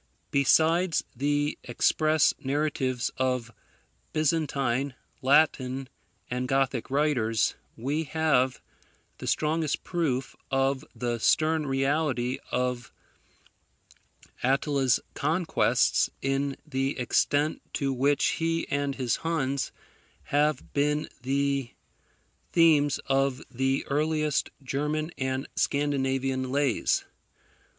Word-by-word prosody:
Besides 160 +5 +3
the 145 +3 0
express 155 +5 +2
narratives 135 -3 -1
of 125 -3 -1 0.6
Byzantine, 140 -4 0 0.3
Latin, 135 -2 +2 0.4
and 125 +1 -2
Gothic 135 -2 0
writers, 130 -6 +1 0.2
we 145 +7 -1
have 150 -4 +1 0.6
the - - -6
strongest 155 -1 0
proof 145 -7 -1
of 135 0 +1
the 120 -1 -2
stern 155 +5 +2
reality 135 -2 0
of 125 -2 -2 1.5
Attila's 135 -1 +2
conquests 165 +4 +2
in 135 +1 -1
the 135 -2 -1
extent 145 +4 +1
to 135 -1 0
which 140 +3 +2
he 165 0 0
and 145 -1 -1
his 125 -3 0
Huns 140 -5 -1 0.5
have 150 +1 0
been 150 +1 +1
the 140 -1 -1 0.8
themes 150 -4 +4
of 135 -1 +1
the 135 +1 0
earliest 150 0 0
German 150 +4 -2
and 130 +1 -1
Scandinavian 135 -2 0
lays. 140 0 +1
140 Hz, 90 wpm, -27 LUFS, 130-150 Hz, 1.5 s, themes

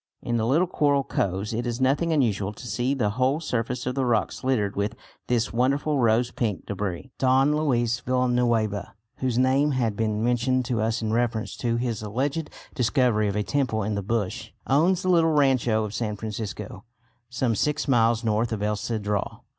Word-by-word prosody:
In 120 -1 -1
the 110 0 0
little 155 +8 +3
coral 145 -5 +1
coves 100 -2 -2
it 120 +2 -2
is 120 +1 -3
nothing 140 +6 +2
unusual 105 -9 +1
to 110 - -11
see 120 +5 -1
the 110 -6 0
whole 130 +6 +1
surface 125 -5 -2
of 125 - -1
the 135 0 -1
rocks 120 0 0
littered 110 -7 0
with 100 +2 -1 0.3
this 120 -2 0
wonderful 140 +4 +1
rose 120 +1 +2
pink 110 -5 -2
debris. 100 +3 -4
Don 135 +3 +3
Luis 120 -6 +1
Villanueva, 120 -5 0 0.2
whose 130 -3 -1
name 135 +3 +3
had 115 -5 0
been 110 0 -1
mentioned 125 +1 +1
to 120 -3 -1
us 115 +1 -1
in 110 0 -1
reference 115 -1 -1
to 115 -2 0
his 120 -2 -2
alleged 135 +9 -2 0.2
discovery 120 -4 +2
of 100 - -2
a 105 - 0
temple 115 -3 0
in 105 +2 -2
the 100 - -1
bush, 105 -1 -2 0.2
owns 170 +7 +2
the 185 - 0
little 165 -3 +4
rancho 130 -6 +2
of 105 -1 -5
San 110 -3 -2
Francisco, 105 -1 -6 0.5
some 125 -1 0
six 150 +7 0
miles 115 -3 +3
north 110 +1 0
of 105 -2 -2
El 105 0 0
Cedral. 105 -2 -3
120 Hz, 185 wpm, -25 LUFS, 110-130 Hz, 0.5 s, little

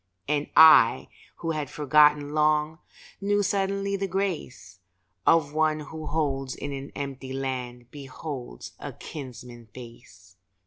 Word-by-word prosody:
And 150 0 -1
I, 155 -7 +7 0.3
who 165 - -3
had 150 -3 -3
forgotten 150 0 +3
long, 155 +1 +1 0.4
Knew 205 +1 +1
suddenly 200 0 -1
the 195 0 -2
grace 175 - -4 0.5
Of 155 -3 +4
one 155 0 +1
who 150 -3 -3
in 145 0 -5
an 135 0 -7
empty 135 -2 -6
land 125 -2 -5
Beholds 135 - -8
a - - -7
kinsman's 120 -5 -10
face. 115 -7 -14
145 Hz, 120 wpm, -26 LUFS, 130-160 Hz, 0.5 s, I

